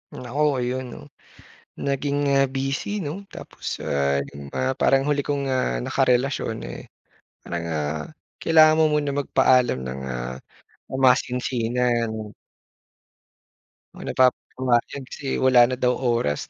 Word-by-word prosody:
Naku 125 +4 -4 0.2
ayun 130 +1 -2
'no, - - -9 0.9
naging, 140 +1 -1 0.2
ah, 135 - +5
busy 135 +6 -2
'no 145 - -3 0.2
tapos, - - -11 0.2
ah, 70 0 0
nung 70 0 -10
mga 130 0 0
parang 135 0 +4
huli 145 -1 +2
kong, 145 -1 -1
ah, 60 - 0
nakarelasyon, 125 - +1
eh, - - -8 0.6
parang, 85 -1 -4
ah, 75 0 -2 0.4
kailangan 155 -1 +5
mo 160 - +5
muna 145 -1 +1
magpaalam 130 - +3
ng, 65 +1 -5
ah, 60 0 -4 0.7
masinsinan. 120 -3 +1 1.6
Na - - -5
pap 130 -1 +4 0.2
pumayag 130 +1 0
kasi 135 0 -4
wala 125 -2 +5
na 130 - -2
daw 125 0 +2
oras 120 - -1
125 Hz, 125 wpm, -23 LUFS, 110-135 Hz, 1.6 s, ah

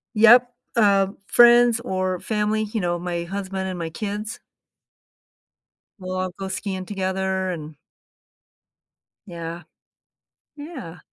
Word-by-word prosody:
Yep. 240 +3 +7 0.3
Um, 200 -2 +3
friends 240 -1 +6
or 185 -5 -2
family, 215 +1 0
you 215 0 -3
know, 175 0 0
my 175 -1 -3
husband 190 0 -4
and 185 - -5
my 165 -1 -4
kids 210 +4 -5 1.6
we'll 185 0 -5
all 185 0 -2
go 195 - -5
skiing 190 -1 -4
together 190 -1 -2
and 155 -3 -7 1.5
Yeah. 170 -1 -7 0.9
Yeah. 285 - -9
190 Hz, 110 wpm, -23 LUFS, 180-215 Hz, 1.6 s, Yep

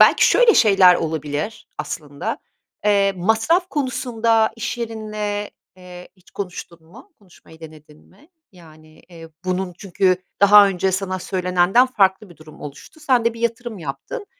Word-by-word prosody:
belki - - +6
şöyle 485 -2 +5
şeyler 195 -4 +6
olabilir 155 +4 -4
aslında. 145 -2 -5 0.5
Eee, 200 -1 +3
masraf 220 - +1
konusunda 230 -5 0
iş 235 +1 -4
yerinle, 215 -2 -4 0.3
eee, 180 -1 -12
hiç 185 - -24
konuştun 180 -3 -8
mu? 250 - -17
Konuşmayı 170 -4 -20
denedin 155 -1 -14
mi? 290 - -23 0.2
Yani, 155 -3 -18
eee, 165 -2 -13 0.2
bunun 185 0 -2
çünkü 190 -1 +1 0.2
daha 200 0 +7
önce 190 0 -1
sana 190 0 -2
söylenenden 180 +6 +2
farklı 195 -4 +1
bir 170 - -16
durum 155 -1 -16
oluştu. 145 - -11
Sen 255 -6 +1
de 230 0 0
bir 230 - -11
yatırım 235 -1 -3
yaptın. 140 - -7
195 Hz, 140 wpm, -20 LUFS, 175-225 Hz, 0.5 s, daha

